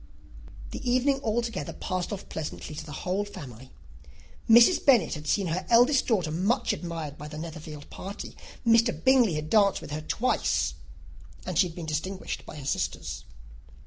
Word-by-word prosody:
The - - -6
evening 265 +2 +2
altogether 230 -1 -2
passed 185 -2 -3
off 200 -1 -6
pleasantly 155 0 -6
to 155 +1 -6
the 155 - -10
whole 190 +3 0
family. 130 - -10 0.8
Mrs. 235 +10 +7
Bennet 240 - +5
had 150 0 -7
seen 200 +5 +2
her 175 +2 -1
eldest 245 +4 +5
daughter 185 -10 +1
much 195 - +1
admired 165 -4 -5
by 150 - -7
the 150 0 -8
Netherfield 155 -2 -8
party. 195 +2 -7 0.3
Mr. 230 +1 +5
Bingley 255 - +5
had 155 0 -4
danced 200 -3 +4
with - - -10
her 155 +1 -3
twice, 240 +10 0 0.7
and - - -4
she 185 - +5
had 165 - -11
been 170 - -6
distinguished 175 +5 -4
by - - -8
his 140 -2 -3
sisters. 95 0 -3
185 Hz, 165 wpm, -27 LUFS, 155-230 Hz, 0.8 s, Mrs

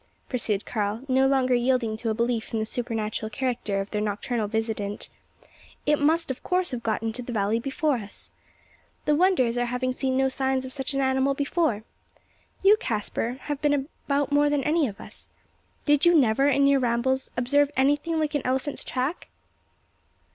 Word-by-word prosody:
pursued 215 -5 -1
Karl, 215 +1 -2
no 265 0 +3
longer 265 -2 +2
yielding 240 -2 +1
to 225 +1 -3
a 220 - 0
belief 235 0 -1
in - - +1
the 220 - -1
supernatural 220 -2 -2
character 220 -4 -2
of 195 +1 -4
their 210 - -1
nocturnal 215 +2 -2
visitant 215 -2 -3 0.8
"it 295 0 +3
must 315 +1 +2
of 260 - -6
course 365 -2 0
have 245 -2 -4
got 225 -1 -1
into 225 +2 -2
the 245 - -6
valley 215 0 +1
before 275 +2 0
us. 205 -3 -6 0.7
The 300 - +3
wonder 360 -3 +4
is 235 +1 -1
our 245 - 0
having 250 +1 -1
seen 260 0 -1
no 265 0 +3
signs 265 0 0
of 260 - -7
such 270 0 -2
an 275 - +1
animal 265 +1 +2
before. 285 -6 0 0.8
You, 405 +2 +7
Caspar, 225 - -2
have 290 -1 -4
been 295 -1 +3 0.3
about 285 0 +1
more 290 0 +4
than 290 -2 +1
any 310 -1 +2
of 200 - -8
us. - - -8 0.6
Did 295 -1 +3
you 345 0 +6
never, 270 0 +3
in 280 0 +3
your 280 0 +4
rambles, 255 +2 0
observe 285 +4 +3
anything 290 +5 +2
like 310 -1 -1
an 290 - 0
elephant's 265 +3 -1
track?" 265 +7 -3
260 Hz, 185 wpm, -26 LUFS, 225-285 Hz, 0.8 s, You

